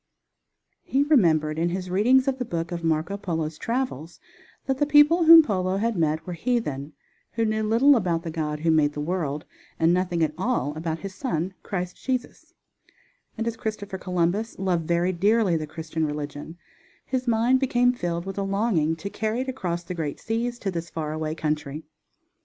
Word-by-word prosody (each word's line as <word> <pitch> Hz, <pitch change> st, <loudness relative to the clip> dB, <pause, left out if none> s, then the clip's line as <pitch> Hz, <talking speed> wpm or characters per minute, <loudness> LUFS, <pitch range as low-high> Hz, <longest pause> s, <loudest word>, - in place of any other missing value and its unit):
He 275 Hz, +2 st, +1 dB
remembered 160 Hz, -, +3 dB
in 170 Hz, +1 st, +1 dB
his 185 Hz, 0 st, -4 dB
readings 255 Hz, +8 st, +4 dB
of 265 Hz, -1 st, 0 dB
the -, -, 0 dB
book 170 Hz, -7 st, -4 dB
of 170 Hz, -1 st, -4 dB
Marco 165 Hz, +4 st, 0 dB
Polo's 160 Hz, -5 st, -3 dB
travels 230 Hz, -, -3 dB, 0.5 s
that 270 Hz, -1 st, -1 dB
the 290 Hz, -, +2 dB
people 300 Hz, +4 st, +5 dB
whom 325 Hz, 0 st, +10 dB
Polo 185 Hz, -6 st, -1 dB
had 230 Hz, +2 st, 0 dB
met 160 Hz, -2 st, 0 dB
were 180 Hz, -, -5 dB
heathen 160 Hz, -, -2 dB, 0.4 s
who 230 Hz, -1 st, 0 dB
knew 215 Hz, 0 st, 0 dB
little 230 Hz, +7 st, +5 dB
about 175 Hz, -7 st, 0 dB
the 165 Hz, -, -4 dB
God 150 Hz, -2 st, -3 dB
who 165 Hz, -, +1 dB
had 160 Hz, -, +4 dB
made 145 Hz, -1 st, +2 dB
the 150 Hz, -, -6 dB
world, 150 Hz, -2 st, -2 dB, 0.3 s
and 165 Hz, +1 st, +3 dB
nothing 180 Hz, -2 st, +1 dB
at 155 Hz, -1 st, 0 dB
all 190 Hz, -, -1 dB
about 160 Hz, 0 st, -3 dB
His 195 Hz, -1 st, -6 dB
Son, 190 Hz, -, -2 dB
Christ 180 Hz, -2 st, -5 dB
Jesus, 255 Hz, -2 st, -4 dB, 0.8 s
and 225 Hz, -, -2 dB
as 230 Hz, -1 st, -2 dB
Christopher 205 Hz, -3 st, -5 dB
Columbus 180 Hz, +5 st, -1 dB
loved 180 Hz, -4 st, -1 dB
very 175 Hz, +2 st, +2 dB
dearly 200 Hz, +1 st, +2 dB
the 155 Hz, -1 st, -2 dB
Christian 160 Hz, +1 st, -4 dB
religion, 150 Hz, +2 st, -6 dB, 0.5 s
his 255 Hz, -1 st, -2 dB
mind 235 Hz, +3 st, +3 dB
became 245 Hz, -2 st, +2 dB
filled 170 Hz, -6 st, -3 dB
with 195 Hz, +1 st, -5 dB
a -, -, 0 dB
longing 195 Hz, -5 st, +1 dB
to 180 Hz, +5 st, -6 dB
carry 220 Hz, +3 st, -1 dB
it 260 Hz, -, -4 dB
across 175 Hz, -9 st, -3 dB
the 175 Hz, -, -6 dB
great 155 Hz, -5 st, -4 dB
seas 235 Hz, +2 st, -2 dB
to 200 Hz, -4 st, -3 dB
this 170 Hz, -1 st, -5 dB
far 155 Hz, -1 st, -4 dB
away 155 Hz, 0 st, -3 dB
country. 150 Hz, -1 st, -3 dB
180 Hz, 185 wpm, -25 LUFS, 160-230 Hz, 0.8 s, whom